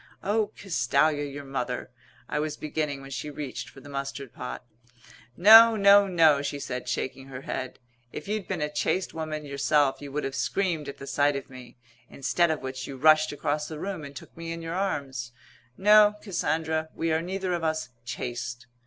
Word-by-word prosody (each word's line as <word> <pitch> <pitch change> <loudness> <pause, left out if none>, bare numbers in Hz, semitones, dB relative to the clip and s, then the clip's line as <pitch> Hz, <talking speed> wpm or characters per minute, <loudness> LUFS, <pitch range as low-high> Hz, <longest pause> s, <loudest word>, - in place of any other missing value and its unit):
"Oh, 210 +1 +1
Castalia, 145 -3 +1
your 145 0 -7
mother 130 -2 -4 0.2
" 125 -2 -29
I 150 - -2
was 150 0 -2
beginning 150 -2 -3
when 135 0 -11
she 150 - -4
reached 140 -5 -6
for 135 - -14
the 145 - -13
mustard 140 -2 -5
pot. 125 - -7 0.7
"No, 225 +4 +9
no, 200 -1 +6
no," 160 -6 +4
she 145 0 -3
said, 125 -2 -5
shaking 135 +1 -3
her 130 -1 -8
head. 130 -1 -5 0.3
"If - - -7
you'd 210 -2 -2
been - - -2
a 150 - -2
chaste 180 +5 0
woman 155 -2 -4
yourself 140 0 +1
you 140 -1 -8
would 150 +2 -2
have 135 - -3
screamed 165 -1 -1
at 140 - -8
the 140 - -9
sight 145 +1 +2
of 135 -1 -6
me 130 -1 -12 0.3
instead 170 +5 +1
of 155 -3 -2
which 130 -1 -5
you 135 - -7
rushed 155 +2 +5
across 150 0 -2
the 155 - -7
room 190 -3 -4
and 140 -1 -9
took - - -11
me 165 0 -6
in 165 0 -6
your 165 0 -4
arms. 140 -11 -3 0.4
No, 210 +1 +6
Cassandra. 160 -5 -1
We 165 0 -1
are 160 - +1
neither 185 +1 -2
of 170 -1 -2
us 155 -3 -1
chaste." 120 0 -5
150 Hz, 195 wpm, -27 LUFS, 135-165 Hz, 0.7 s, No